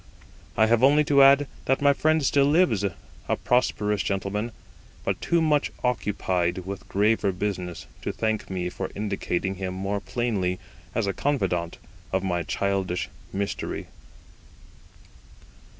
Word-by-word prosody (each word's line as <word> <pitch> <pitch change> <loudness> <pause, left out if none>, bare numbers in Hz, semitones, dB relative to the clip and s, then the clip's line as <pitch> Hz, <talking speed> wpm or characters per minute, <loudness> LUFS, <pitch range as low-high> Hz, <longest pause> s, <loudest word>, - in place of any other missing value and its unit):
I 110 - +6
have 115 +1 +3
only 145 +3 +6
to 140 -1 +4
add, 140 +1 +7 0.2
that 135 - +2
my 140 0 +5
friend 155 +1 +2
still 140 +1 +4
lives, 150 - +3
a 95 -4 -4
prosperous 105 -5 +1
gentleman, 100 +4 -2 0.5
but - - -1
too 170 -1 +2
much 150 -2 +2
occupied 95 -6 0
with 100 0 -7
graver 105 0 +2
business 90 -2 -4 0.2
to - - -2
thank 110 -1 -2
me 90 -2 -2
for 95 +1 -5
indicating 95 -2 -2
him 95 -1 -4
more 100 +2 -2
plainly 100 -5 -1 0.4
as - - +1
a 100 - -1
confidant 90 - -1 0.3
of 95 0 0
my 90 -2 0
childish 95 +1 -1 0.2
mystery. 100 0 -3
100 Hz, 135 wpm, -26 LUFS, 95-125 Hz, 0.5 s, add